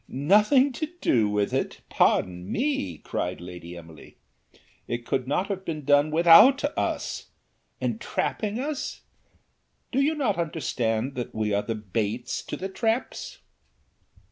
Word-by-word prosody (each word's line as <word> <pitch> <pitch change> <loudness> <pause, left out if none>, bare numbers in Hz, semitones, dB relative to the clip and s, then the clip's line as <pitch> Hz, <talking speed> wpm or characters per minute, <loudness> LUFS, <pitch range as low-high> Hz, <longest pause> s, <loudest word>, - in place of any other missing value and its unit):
"Nothing 210 - +4
to 305 +5 -3
do 110 - +2
with 105 -1 0
it! - - -2
pardon 90 0 +1
me," 235 - -1
cried 90 +4 -4
Lady 90 0 -9
Emily. 80 -2 -13 0.7
"It 120 0 -4
could 130 +1 -1
not 150 +7 +1
have 195 -2 -4
been 155 -5 -5
done 145 +1 +4
without 175 - +7
us. - - -2 0.5
Entrapping 215 +1 -2
us! 290 +1 -4 0.9
do 270 - +2
not 250 - 0
you - - +1
understand 130 -6 -1
that 125 -2 -5
we 110 -1 0
are 100 - +2
the 115 +1 -3
baits 110 +3 -3
to - - -5
the 190 - -4
traps? 225 +5 -2
145 Hz, 135 wpm, -26 LUFS, -, 0.9 s, without